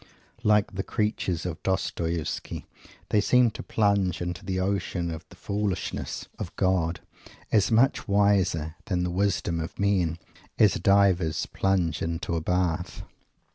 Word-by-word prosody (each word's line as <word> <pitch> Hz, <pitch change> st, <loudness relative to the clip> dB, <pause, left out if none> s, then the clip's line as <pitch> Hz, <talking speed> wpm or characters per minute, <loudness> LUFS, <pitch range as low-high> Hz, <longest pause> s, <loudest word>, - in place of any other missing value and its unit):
Like 105 Hz, -3 st, +3 dB
the 95 Hz, -, -2 dB
creatures 95 Hz, -5 st, -1 dB
of 90 Hz, -3 st, -4 dB
Dostoievsky, 85 Hz, -3 st, -2 dB, 0.4 s
they 105 Hz, -, +3 dB
seem 125 Hz, +2 st, +4 dB
to -, -, -7 dB
plunge 100 Hz, -4 st, +1 dB
into 90 Hz, 0 st, -4 dB
the 95 Hz, -1 st, -2 dB
ocean 95 Hz, -3 st, -1 dB
of 80 Hz, -1 st, -6 dB
the -, -, -14 dB
Foolishness 100 Hz, -2 st, -3 dB
of -, -, -6 dB
God, 90 Hz, -3 st, +1 dB, 0.5 s
so 105 Hz, +2 st, +4 dB
much 130 Hz, +5 st, +3 dB
wiser 100 Hz, -6 st, +2 dB
than 90 Hz, -2 st, 0 dB
the 90 Hz, -, -1 dB
wisdom 90 Hz, -3 st, 0 dB
of 80 Hz, -, -5 dB
men! 95 Hz, -5 st, +1 dB, 0.4 s
as 105 Hz, -5 st, +5 dB
divers 95 Hz, -5 st, +3 dB
plunge 95 Hz, -4 st, 0 dB
into 85 Hz, +1 st, -2 dB
a 80 Hz, -, -1 dB
bath. 90 Hz, 0 st, -1 dB
95 Hz, 135 wpm, -27 LUFS, 85-100 Hz, 0.5 s, as